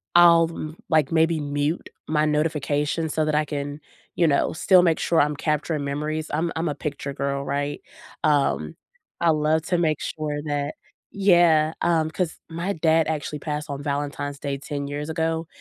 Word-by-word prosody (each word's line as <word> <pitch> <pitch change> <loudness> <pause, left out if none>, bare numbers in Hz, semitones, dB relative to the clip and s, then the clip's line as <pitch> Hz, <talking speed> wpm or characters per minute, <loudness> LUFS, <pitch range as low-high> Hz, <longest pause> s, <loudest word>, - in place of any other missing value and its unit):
I'll 170 -1 +7
m 155 -1 -6
like 155 -1 +3
maybe 160 0 +3
mute 145 +3 -2 0.2
my 155 0 +2
notification 150 0 0
so 155 +1 0
that 155 -1 0
I 150 - +2
can, 145 0 -4 0.4
you 170 - +3
know, 140 -2 +2
still 185 +3 +5
make 165 -3 +2
sure 165 - +3
I'm 150 0 +1
capturing 150 -1 -1
memories, 150 +2 -3
I'm 165 +3 0
I'm 165 +1 -1
a 145 - -3
picture 145 -1 -4
girl, 140 0 -2
right, 145 +1 -2 0.4
um, 140 - +1 0.5
I 170 - +4
love 155 +1 +2
to 175 - +3
make 155 -3 +1
sure 150 -1 -3
that 145 0 -1 0.4
Yeah, 170 -5 +5
um, 160 -2 +2
'cause 170 0 -2
my 170 +4 -2
dad 160 -1 +2
actually 150 -1 -3
passed 150 +1 -4
on 140 0 -4
Valentine's 145 0 -3
Day 140 -1 -3
10 140 +1 -5
years 145 +2 -4
ago, 160 0 -1
155 Hz, 175 wpm, -24 LUFS, 145-160 Hz, 0.5 s, I'll